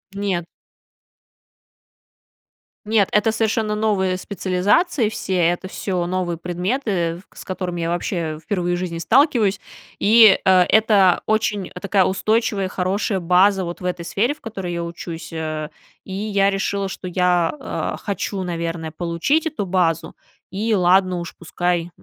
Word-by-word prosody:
Нет. 195 -4 -1 2.4
Нет, 210 -2 +3
это 210 +1 +3
совершенно 220 -1 0
новые 200 -4 0
специализации 200 - +1
все, 200 -3 -3
это 175 +2 +1
всё 180 -3 -2
новые 175 -1 -2
предметы, 180 - -2
с - - -11
которыми 180 -2 -4
я 165 0 -1
вообще 170 -2 -2
впервые 175 -2 -1
в - - -3
жизни 175 -2 -4
сталкиваюсь, 220 - +2 0.4
и, 220 -1 +7
э, - - +2 0.2
это 210 -4 +4
очень 215 -3 0
такая 200 -1 +2
устойчивая, 205 +1 0
хорошая 190 +1 -1
база 190 +3 +4
вот 175 0 -6
в 180 - -8
этой 180 -1 -2
сфере, 225 +10 0
в 300 - -22
которой 195 -6 -5
я 170 0 -3
учусь, 170 -1 -7
э. 155 -1 -4 0.3
И 190 - -11
я 200 0 +1
решила, 195 0 -1
что 185 - -7
я, 180 -1 +1
а, 270 - -4
хочу, 200 -1 -3
наверное, 165 -2 -4
получить 175 - 0
эту 295 -10 -3
базу, 170 -3 0 0.4
и 215 +4 0
ладно 185 -1 +3
уж, 170 - -7
пускай 175 0 -2
185 Hz, 140 wpm, -21 LUFS, 175-210 Hz, 2.4 s, и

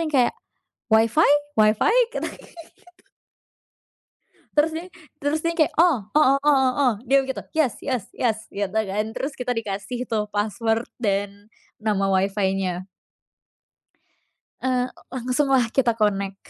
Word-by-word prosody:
yang - - -8
kayak, 250 -2 +3 0.6
WiFi? 225 +8 +4 0.3
WiFi? 215 - +4 0.2
Kita - - -3
gitu. 335 -2 -14 1.9
Terus 305 +2 +4
dia 330 +2 -4 0.4
terus 290 +2 0
dia 335 - +1
yang 335 - -11
kayak, 310 - +2
"Oh 340 -5 +5 0.2
oh 275 -3 +5
oh 275 -3 +4
oh" 255 -4 +4
dia 275 +2 +4
begitu 265 -1 -5
"yes 285 -7 +2
yes 255 -7 -2
yes" 225 -3 0
gitu 200 -1 -3
kan, 200 +2 -1
terus 280 +2 -3
kita 250 0 -2
dikasih 220 +3 -4
tuh 215 -2 0
password 225 +3 -1
dan 205 -1 -2 0.3
nama 205 -3 0
WiFi-nya. 190 -1 0 1.8
Eee, 255 -1 0 0.2
langsung 255 +3 0
lah 240 -4 +2
kita 240 -3 +2
connect. 200 -3 0
230 Hz, 130 wpm, -23 LUFS, 205-270 Hz, 1.9 s, Oh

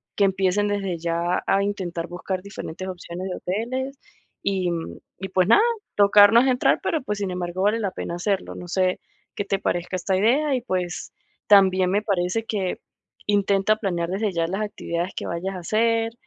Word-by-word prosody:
que 200 - +4
empiecen 195 +1 +1
desde 195 -4 -1
ya 170 +1 0
a 195 0 +3
intentar 175 -4 -3
buscar 180 +2 -4
diferentes 185 -2 -7
opciones 180 +1 -6
de 180 - -3
hoteles. 255 +8 -3 0.5
Y 190 -3 0 0.5
y, 190 - -3
pues, 185 -1 +2
nada, 415 - +7 0.3
tocar 205 0 +7
no 230 - +7
es 265 - +3
entrar, 250 -1 +3
pero, 320 - -1
pues, 210 -4 -3
sin 195 -2 -2
embargo 180 +1 -3
vale 210 +3 +3
la 200 -4 -1
pena 170 - -5
hacerlo, 195 +2 -2
no 180 - -8
sé 185 0 +1 0.4
qué 205 - -2
te 195 0 0
parezca 175 -1 -2
esta 190 +1 0
idea. 270 +7 +3
Y, 250 - -1
pues, 180 -6 -3 0.4
también 190 -2 +5
me 205 +2 +2
parece 200 +2 -1
que 195 -5 -2 0.5
intenta 200 0 +2
planear 175 -5 -2
desde 200 +2 -1
ya 165 -1 0
las 195 +4 -2
actividades 180 -3 -3
que - - -4
vayas 185 +3 -3
a - - -5
hacer, 225 +4 +1
195 Hz, 185 wpm, -24 LUFS, 180-210 Hz, 0.5 s, nada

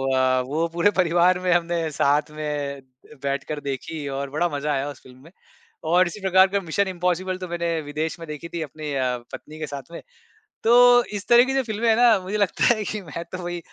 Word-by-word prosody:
अ, 130 0 +3
वो 160 +4 0
पूरे 175 +4 +3
परिवार 175 +1 +3
में 185 0 0
हमने 170 -2 0
साथ 145 +1 +1
में 145 -2 -4 0.4
बैठकर 140 +2 -3
देखी 145 +2 -4
और 140 0 -4
बड़ा 175 +1 +2
मज़ा 150 +1 -2
आया 135 +1 -1
उस 145 - -10
फ़िल्म 125 -1 -16
में 165 - -16 0.6
और 180 +1 +5
इसी 210 - -7
प्रकार 190 0 +5
का 200 +1 -1
मिशन 190 +4 -1
इम्पॉसिबल 180 0 -1
तो 185 -1 -6
मैंने 170 -1 -2
विदेश 155 +3 -4
में 165 - -9
देखी 150 +2 -7
थी 170 - -3
अपनी 150 0 -6
अ, 130 -2 0 0.2
पत्नी 155 +1 -9
के 155 - -4
साथ 140 +3 -10
में, 170 - -8 0.6
तो 245 +1 +6
इस 205 -1 -7
तरह 240 +1 +7
की 265 - -2
जो 270 - +2
फ़िल्में 225 0 -2
हैं 225 - +4
ना, 235 -4 +5
मुझे 190 +3 -4
लगता 205 +4 +3
है 215 - -4
कि 210 +3 -4
मैं 170 0 -7
तो 185 - -5
वही, 175 0 -4
170 Hz, 220 wpm, -23 LUFS, 150-190 Hz, 0.6 s, तरह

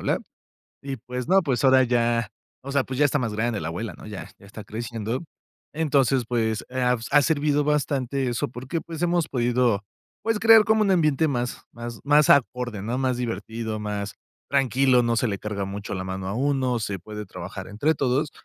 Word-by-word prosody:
blá". - - 0 0.6
Y, 135 -2 -5
pues, 125 +4 -6
no, 190 +2 +5
pues, 135 -5 -1
ahora 130 0 +6
ya, 120 -2 +1 0.3
o 140 +1 -7
sea, 140 -2 +2
pues 130 +1 -5
ya 145 - +5
está 145 +1 +2
más 115 -4 -2
grande 110 -2 -1
la 80 - -3
abuela, 105 +6 -4
¿no?, - - -12
ya 105 -3 -7
ya 100 - -17
está 105 +1 -10
creciendo. 115 +4 -4 0.5
Entonces, 140 -5 +2
pues, 110 -3 -1
ha 125 -1 +1
ha 145 0 +6
servido 150 -1 +2
bastante 140 -3 0
eso, 120 - -1
porque, 130 +7 -4
pues, 165 0 -8
hemos 175 -2 +1
podido, 120 -4 +1 0.4
pues, 225 -1 0
crear 225 0 +8
como 220 0 +3
un 200 -2 +3
ambiente 155 -3 +3
más 125 -3 -2
más 120 -1 -7
más 145 +1 +4
acorde, 125 -5 +2
¿no?, 120 +5 -2
más 130 -2 0
divertido, 115 -2 -4
más 105 -1 -4 0.4
tranquilo, 135 -2 +3
no 115 0 +1
se 120 - +1
le 100 -2 -3
carga 100 -2 -3
mucho 100 +1 -5
la 95 - -3
mano 95 0 -5
a 100 - -2
uno, 130 -2 +1
se 100 -3 -3
puede 105 +2 -7
trabajar 90 +1 -8
entre 140 +11 0
todos 135 +3 0
125 Hz, 195 wpm, -25 LUFS, 110-140 Hz, 0.6 s, crear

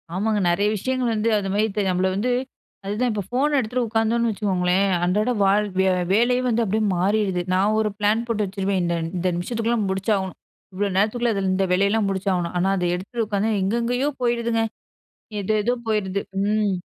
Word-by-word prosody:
ஆமாங்க. 210 +2 0
நிறைய 200 +4 +2
விஷயங்கள் 250 +2 -1
வந்து 220 +1 0
அதுமாரி 200 +1 0
இப் 210 - -4
நம்மள 185 +1 +1
வந்து 245 +5 0 0.5
அதுதான் 225 +5 0
இப்போ 205 -2 -2
ஃபோன 285 +4 +1
எடுத்துட்டு 245 +1 -1
உட்காந்தோன்னு 225 +1 +1
வச்சுக்கோங்களேன், 190 -2 +1 0.2
அன்றாட 210 +7 +1
வாழ் 205 +2 +3 0.5
வேலையே 245 +3 +3
வந்து 235 -1 +1
அப்டியே 215 +1 0
மாறிடுது. 190 -1 +1
நான் 200 +3 +2
ஒரு 215 - +1
பிளான் 215 +3 +2
போட்டு 215 -3 0
வச்சுருவேன். 195 -1 -1
இந்த 170 0 0 0.2
இந்த 180 +1 -1
நிமிஷத்துக்குள்ள 230 +6 -1
முடிச்சாகணும். 190 -1 -1 0.4
இவ்ளோ 200 +1 0
நேரத்துக்குள்ள 230 +3 +1
அதில 190 -1 0
இந்த 195 0 +1
வேலையெல்லாம் 200 +2 +2
முடிச்சாகணும். 190 -3 -1
ஆனா 190 +2 +2
அத 180 - -1
எடுத்துட்டு 225 +5 -3
உட்காந்தா 210 +1 0
எங்கெங்கேயோ 235 +7 0
போயிடுதுங்க. 235 -1 +1 0.8
எதோ 215 +2 0
எதோ 245 +2 +2
போயிருது. 200 -2 0 0.2
ம். 210 -1 +1
210 Hz, 160 wpm, -23 LUFS, 195-230 Hz, 0.8 s, வாழ்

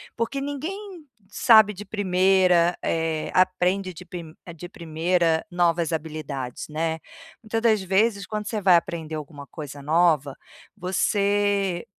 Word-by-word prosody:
Porque 235 +4 -2
ninguém 340 +7 -6 0.3
sabe 220 -1 +5
de 200 +2 -8
primeira, 185 -3 +3
eh, 160 -1 -1
aprende 185 +1 +1
de 180 +3 -11
pi 170 -4 -9 0.2
de 175 +2 -9
primeira 165 0 0
novas 170 -2 +1
habilidades, 150 -5 -5
né. 160 +1 -2 0.4
Muita 225 +1 -2
das 220 -3 +3
vezes 200 +2 +1
quando 210 -1 -5
você 215 -2 -3
vai 185 -3 +6
aprender 165 -3 -4
alguma 145 -1 -8
coisa 145 -2 -9
nova, 155 -2 +2 0.4
você 200 -1 0
180 Hz, 125 wpm, -24 LUFS, 160-205 Hz, 0.4 s, vai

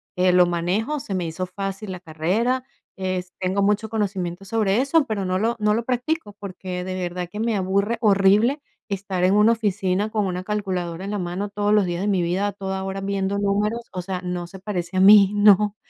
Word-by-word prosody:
que 185 0 +3
lo 180 0 +6
manejo, 185 - -1
se 200 - -6
me 180 -2 -1
hizo 165 +3 -4
fácil 195 +2 -5
la 180 - -6
carrera, 190 +11 -1 0.3
es 185 -1 -3
tengo 190 +2 0
mucho 210 +2 +1
conocimiento 195 -4 -3
sobre 210 0 +1
eso, 280 +2 +2
pero 215 -5 -2
no 185 0 0
lo 230 +4 0
no 210 0 +2
lo 230 - -1
practico, 250 -1 -2
porque 185 -2 -6
de 185 0 -4
verdad 180 -1 -4
que 210 - -6
me 225 -1 0
aburre 200 +4 0
horrible 210 +6 +4 0.3
estar 195 -2 -3
en 190 +2 +3
una 210 +2 +5
oficina 205 -2 0
con 215 -2 0
una 180 -1 -3
calculadora 185 -4 -3
en 200 - -4
la 205 - -2
mano 180 +3 -3
todos 205 0 -1
los 210 -3 +4
días 175 0 -3
de 200 - -1
mi 195 -3 +2
vida, 185 +4 0
a 205 - -3
toda 190 -1 -4
hora 195 0 -4
viendo 195 0 -1
números, 205 +3 0
o 185 - -3
sea, 180 0 -4
no 180 -1 -4
se 190 - -11
parece 185 -2 -4
a - - +4
mí, 200 0 +8
no, 205 0 +5
195 Hz, 215 wpm, -23 LUFS, 185-210 Hz, 0.3 s, mí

